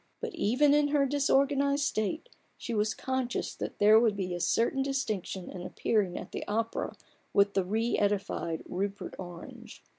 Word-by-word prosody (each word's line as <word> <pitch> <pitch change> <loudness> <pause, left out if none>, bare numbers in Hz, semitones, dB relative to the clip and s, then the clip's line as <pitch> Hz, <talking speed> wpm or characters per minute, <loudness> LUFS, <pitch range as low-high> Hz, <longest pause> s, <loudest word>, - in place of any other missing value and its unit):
But - - -5
even 280 +7 +3
in 295 0 +4
her 285 -1 +2
dis 280 +1 0
organized 280 +1 +3
state 275 - -1 0.3
she 235 - -5
was 215 0 +1
conscious 260 -2 -2
that - - -6
there 215 +2 +7
would 225 -3 +2
be 185 -2 -2
a 175 - -3
certain 235 +9 +1
distinction 215 -9 -2
in 180 - -7
appearing 190 0 0
at - - -7
the - - -4
opera 225 +2 -2 0.4
with 200 0 +4
the 195 - +2
re 220 +5 0
edified 200 -5 -1
Rupert 200 +2 -3
Orange. 175 -2 -10
220 Hz, 170 wpm, -30 LUFS, 200-270 Hz, 0.4 s, there